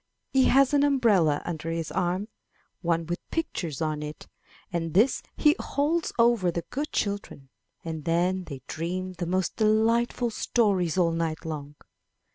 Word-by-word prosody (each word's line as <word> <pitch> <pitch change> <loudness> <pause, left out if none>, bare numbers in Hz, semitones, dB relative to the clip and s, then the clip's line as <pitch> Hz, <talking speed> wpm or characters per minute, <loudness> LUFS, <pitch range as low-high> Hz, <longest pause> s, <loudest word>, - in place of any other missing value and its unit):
He 265 -1 +5
has 275 +1 +4
an 285 - +4
umbrella 215 - +3
under 165 -1 -4
his 165 -1 -3
arm, 185 +3 -1 0.5
one 170 -2 0
with 175 +2 -3
pictures 170 - -3
on 155 -1 -2
it, 150 0 -7 0.5
and 165 -2 -2
this 225 +8 +4 0.2
he 300 0 +5
holds 315 +4 0
over 230 -6 +4
the 170 0 -3
good 290 +3 -3
children, 200 -9 -3 0.4
and 160 -2 -4
then 180 +3 +1
they 135 -5 -8
dream 185 +3 -4
the 175 -1 -4
most 185 +1 -1
delight 225 +2 +3
ful 240 -2 -2
stories 195 -8 +1
all 170 -2 +3
night 165 -1 -2
long. 150 -2 -5
180 Hz, 155 wpm, -27 LUFS, 165-230 Hz, 0.5 s, He